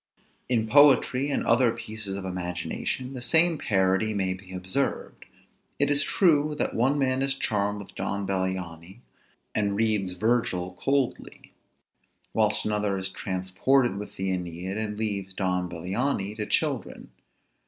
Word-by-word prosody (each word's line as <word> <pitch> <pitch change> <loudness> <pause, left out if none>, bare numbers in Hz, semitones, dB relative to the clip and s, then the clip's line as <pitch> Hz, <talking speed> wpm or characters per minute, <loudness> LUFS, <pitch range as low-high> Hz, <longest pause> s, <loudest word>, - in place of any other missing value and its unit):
In 115 -3 +2
poetry, 140 0 +5
and 140 - -1
other 125 -3 +4
pieces 110 -3 -6
of 100 -1 -5
imagination, 90 +8 -3
the 125 - -6
same 160 +4 +4
parity 95 +2 +1
may 95 -2 0
be 95 0 -12
observed. 95 +9 -3 0.5
It - - +2
is 145 0 +6
true, 150 -3 +2
that - - 0
one 130 +5 +2
man 130 -1 +1
is 135 0 0
charmed 105 -5 0
with 100 - -10
Don 100 0 -3
Bellianis, 95 0 -3 0.5
and 100 -1 0
reads 105 -4 0
Virgil 90 -3 0
coldly; 135 -2 -2 0.8
whilst - - +2
another 105 -2 0
is 95 0 -2
transported 95 +7 0
with 105 - -7
the 95 0 -2
Æneid, 90 +1 -4
and 105 -1 -3
leaves 100 -3 -2
Don 90 -2 -1
Bellianis 100 +5 -2
to 105 -1 -3
children. - - -2
105 Hz, 140 wpm, -26 LUFS, 95-125 Hz, 0.8 s, is